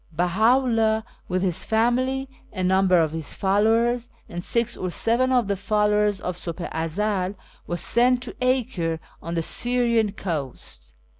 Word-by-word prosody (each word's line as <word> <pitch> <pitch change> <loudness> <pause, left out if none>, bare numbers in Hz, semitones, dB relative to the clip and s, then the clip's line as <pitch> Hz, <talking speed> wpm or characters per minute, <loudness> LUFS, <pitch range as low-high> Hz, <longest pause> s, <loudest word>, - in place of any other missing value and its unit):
Beha 180 +9 +3
iClldh, 225 -4 +1 0.2
with 185 +1 -1
his 185 -1 0
family, 255 +4 +1 0.2
a 185 -3 -4
num 190 +1 +3
ber 180 -1 +5
of 160 -2 0
his 160 -2 -5
followers, 225 +5 +2 0.2
and 175 0 -6
six 235 +3 0
or 185 - -3
seven 235 +8 +1
of 245 -5 +2
the 200 - 0
followers 210 0 +1
of 180 -1 -4
SvJbli 175 0 -5
i 160 0 -2
Ezcl, 195 +2 -1 0.3
was 175 -2 -2
sent 245 +1 +2
to - - -7
Acre, 235 -11 0 0.2
on 170 +1 -5
the 165 - 0
Syrian 235 -1 +1
coast. 135 - -6
210 Hz, 160 wpm, -24 LUFS, 175-235 Hz, 0.3 s, ber